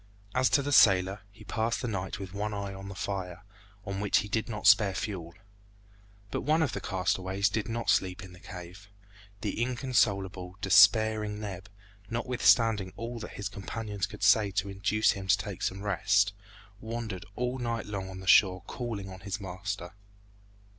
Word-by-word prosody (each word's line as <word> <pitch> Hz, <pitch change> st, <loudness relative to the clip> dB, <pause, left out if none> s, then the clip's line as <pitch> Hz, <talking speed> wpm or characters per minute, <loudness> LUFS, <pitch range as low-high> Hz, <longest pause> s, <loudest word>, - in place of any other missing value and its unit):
As 130 Hz, 0 st, +3 dB
to 140 Hz, -, +3 dB
the 145 Hz, -, -2 dB
sailor, 100 Hz, -5 st, +5 dB
he 110 Hz, +2 st, -15 dB
passed 110 Hz, +2 st, -1 dB
the -, -, -1 dB
night 95 Hz, -4 st, -3 dB
with 95 Hz, -1 st, -8 dB
one 105 Hz, +1 st, -3 dB
eye 100 Hz, -1 st, -4 dB
on 95 Hz, 0 st, -8 dB
the 100 Hz, -, -8 dB
fire, 95 Hz, -2 st, -4 dB, 0.4 s
on 100 Hz, -1 st, -4 dB
which 100 Hz, 0 st, +2 dB
he -, -, -7 dB
did 110 Hz, +2 st, -1 dB
not 105 Hz, -3 st, -5 dB
spare 100 Hz, -1 st, +6 dB
fuel. 85 Hz, -3 st, -5 dB, 1.0 s
But -, -, -2 dB
one 155 Hz, +4 st, +2 dB
of 140 Hz, -, 0 dB
the -, -, -4 dB
castaways 95 Hz, +1 st, 0 dB
did 110 Hz, +3 st, -2 dB
not 115 Hz, 0 st, -3 dB
sleep 95 Hz, +1 st, 0 dB
in 95 Hz, -1 st, -11 dB
the 90 Hz, -, -14 dB
cave. 90 Hz, +4 st, -10 dB, 0.5 s
The 105 Hz, +1 st, -2 dB
inconsolable, 100 Hz, -8 st, 0 dB
despairing 105 Hz, +1 st, +5 dB
Neb, 100 Hz, -2 st, -7 dB, 0.4 s
notwithstanding 115 Hz, -4 st, +2 dB
all 115 Hz, +1 st, -5 dB
that 110 Hz, -, -8 dB
his 100 Hz, -, -4 dB
companions 100 Hz, 0 st, -4 dB
could -, -, -9 dB
say 105 Hz, -1 st, +5 dB
to 100 Hz, 0 st, -2 dB
induce 105 Hz, +2 st, +2 dB
him 95 Hz, -1 st, -6 dB
to 95 Hz, +1 st, +5 dB
take 100 Hz, -4 st, -6 dB
some 95 Hz, +2 st, -2 dB
rest, 100 Hz, 0 st, +2 dB, 0.5 s
wandered 110 Hz, -4 st, -5 dB
all 125 Hz, +1 st, -2 dB
night 115 Hz, -2 st, -2 dB
long 100 Hz, -2 st, -5 dB
on 95 Hz, 0 st, -8 dB
the -, -, -10 dB
shore 95 Hz, -2 st, +5 dB
calling 110 Hz, -3 st, -5 dB
on 95 Hz, 0 st, -9 dB
his 100 Hz, +1 st, -5 dB
master. 95 Hz, -1 st, -5 dB
100 Hz, 175 wpm, -29 LUFS, 95-110 Hz, 1.0 s, spare